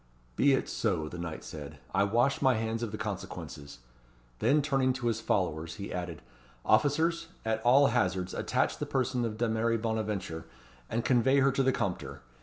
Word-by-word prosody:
"Be 140 Hz, 0 st, +4 dB
it 135 Hz, -, +1 dB
so," 90 Hz, -9 st, -1 dB
the 85 Hz, +2 st, -7 dB
knight 80 Hz, -2 st, -5 dB
said; 75 Hz, -1 st, -8 dB, 0.2 s
"I 100 Hz, -, +3 dB
wash 120 Hz, +6 st, +2 dB
my 130 Hz, -3 st, +4 dB
hands 110 Hz, +1 st, -2 dB
of 115 Hz, -3 st, -3 dB
the 110 Hz, -, -4 dB
consequences." 70 Hz, -8 st, -6 dB, 0.6 s
Then 145 Hz, +1 st, +3 dB
turning 135 Hz, -3 st, +2 dB
to 130 Hz, -1 st, -5 dB
his 115 Hz, -1 st, 0 dB
followers, 85 Hz, -6 st, -1 dB
he 100 Hz, -2 st, -6 dB
added 85 Hz, -3 st, -5 dB, 0.4 s
"Officers, 160 Hz, +9 st, +2 dB, 0.2 s
at 110 Hz, 0 st, 0 dB
all 130 Hz, +5 st, +6 dB
hazards, 95 Hz, -6 st, 0 dB
attach -, -, 0 dB
the -, -, -3 dB
person 130 Hz, -2 st, 0 dB
of 110 Hz, -2 st, -4 dB
Dameris 115 Hz, 0 st, +1 dB
Bonaventure, 105 Hz, -7 st, -2 dB, 0.4 s
and 115 Hz, -, -1 dB
convey 130 Hz, +2 st, +4 dB
her 135 Hz, +1 st, +4 dB
to 135 Hz, -, +1 dB
the 130 Hz, 0 st, +3 dB
Compter. 75 Hz, -, -3 dB
110 Hz, 175 wpm, -30 LUFS, 90-130 Hz, 0.6 s, all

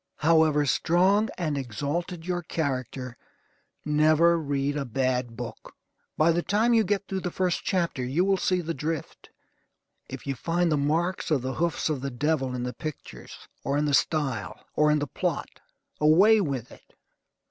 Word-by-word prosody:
However 155 Hz, -2 st, +3 dB
strong 185 Hz, +9 st, +2 dB
and 155 Hz, -5 st, -1 dB
exalted 150 Hz, -, -4 dB
your 175 Hz, -1 st, -1 dB
character, 130 Hz, -6 st, -3 dB, 0.7 s
never 155 Hz, +3 st, +4 dB
read 145 Hz, -1 st, -1 dB
a 145 Hz, -, -1 dB
bad 125 Hz, -2 st, -1 dB
book. 120 Hz, -2 st, -8 dB, 0.4 s
By 160 Hz, +2 st, +4 dB
the 170 Hz, +1 st, +1 dB
time 220 Hz, +6 st, +2 dB
you 225 Hz, -1 st, +5 dB
get 200 Hz, 0 st, -1 dB
through 190 Hz, -, -2 dB
the 180 Hz, -, -3 dB
first 180 Hz, 0 st, -1 dB
chapter 170 Hz, -9 st, -1 dB
you 140 Hz, +9 st, +1 dB
will 195 Hz, 0 st, +3 dB
see 185 Hz, 0 st, +1 dB
the 165 Hz, 0 st, -3 dB
drift; 155 Hz, +1 st, -5 dB, 0.8 s
If -, -, -8 dB
you 140 Hz, -, -1 dB
find 170 Hz, +6 st, 0 dB
the -, -, +3 dB
marks 165 Hz, +7 st, 0 dB
of 145 Hz, -6 st, +1 dB
the 130 Hz, 0 st, -2 dB
hoofs 170 Hz, +3 st, -1 dB
of 150 Hz, -5 st, -2 dB
the 140 Hz, -, -3 dB
devil 135 Hz, 0 st, -1 dB
in 125 Hz, -, -3 dB
the 125 Hz, 0 st, -3 dB
pictures, 140 Hz, -, -9 dB, 0.2 s
or 140 Hz, +2 st, 0 dB
in 150 Hz, -, +1 dB
the 145 Hz, -, 0 dB
style, 135 Hz, -, 0 dB
or 150 Hz, 0 st, +4 dB
in 150 Hz, -, +4 dB
the 145 Hz, -, -1 dB
plot, 130 Hz, -, -3 dB, 0.4 s
away 190 Hz, +9 st, +6 dB
with 135 Hz, -, -3 dB
it. -, -, -18 dB
155 Hz, 170 wpm, -26 LUFS, 135-175 Hz, 0.8 s, away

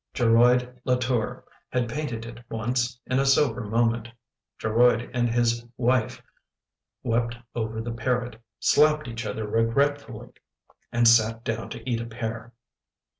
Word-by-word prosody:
" -, -, -57 dB
Geroid 125 Hz, +1 st, +3 dB
Latour 125 Hz, -3 st, 0 dB, 0.3 s
had 125 Hz, -2 st, 0 dB
painted 115 Hz, -3 st, -4 dB
it 120 Hz, +1 st, -10 dB
once, 120 Hz, +2 st, -1 dB
in 130 Hz, +1 st, 0 dB
a 135 Hz, -, +2 dB
sober 135 Hz, -2 st, +3 dB
moment. 115 Hz, +1 st, 0 dB, 0.5 s
Geroid 120 Hz, +2 st, +2 dB
and 120 Hz, -1 st, +1 dB
his 120 Hz, 0 st, +1 dB
wife 125 Hz, -1 st, 0 dB, 0.8 s
wept 115 Hz, +1 st, 0 dB, 0.2 s
over 110 Hz, -1 st, -3 dB
the 115 Hz, +1 st, -4 dB
parrot; 120 Hz, -1 st, -2 dB, 0.2 s
slapped 150 Hz, +2 st, +3 dB
each 115 Hz, -1 st, -5 dB
other 110 Hz, 0 st, -3 dB
regretfully; 120 Hz, +2 st, 0 dB, 0.6 s
and 120 Hz, -1 st, +3 dB
sat 115 Hz, 0 st, +4 dB
down 115 Hz, 0 st, -3 dB
to 115 Hz, 0 st, -9 dB
eat 115 Hz, -2 st, 0 dB
a 115 Hz, -, -6 dB
pear. 115 Hz, 0 st, -5 dB
120 Hz, 135 wpm, -25 LUFS, 115-125 Hz, 0.8 s, sat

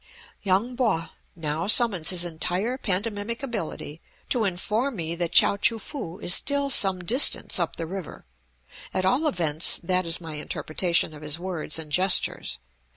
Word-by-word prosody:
Yung 205 Hz, +6 st, 0 dB
Po 220 Hz, -10 st, 0 dB, 0.3 s
now 160 Hz, +1 st, -3 dB
summons 205 Hz, -7 st, +4 dB
his 180 Hz, -2 st, +3 dB
entire 180 Hz, +8 st, -2 dB
pantomimic 210 Hz, +2 st, -2 dB
ability, 170 Hz, -, -5 dB, 0.3 s
to 235 Hz, -4 st, +1 dB
inform 215 Hz, +8 st, -2 dB
me 165 Hz, -3 st, -4 dB
that 170 Hz, 0 st, -2 dB
Chao 200 Hz, -, +5 dB
choo 225 Hz, +2 st, +2 dB
foo 220 Hz, -, -8 dB
is 180 Hz, -, +2 dB
still 280 Hz, +3 st, +1 dB
some 190 Hz, -6 st, +3 dB
distance 250 Hz, +10 st, +5 dB
up -, -, -2 dB
the 165 Hz, -, -5 dB
river, 185 Hz, 0 st, -8 dB, 0.7 s
at 185 Hz, -, 0 dB
all 265 Hz, +11 st, +1 dB
events 165 Hz, -, 0 dB
that 185 Hz, 0 st, -1 dB
is 165 Hz, -, -2 dB
my 160 Hz, -3 st, -8 dB
interpretation 165 Hz, +2 st, -2 dB
of 150 Hz, -, -12 dB
his 150 Hz, 0 st, 0 dB
words 175 Hz, -4 st, -5 dB
and 155 Hz, -2 st, -7 dB
gestures. 185 Hz, -, +2 dB
185 Hz, 155 wpm, -24 LUFS, 165-220 Hz, 0.7 s, Chao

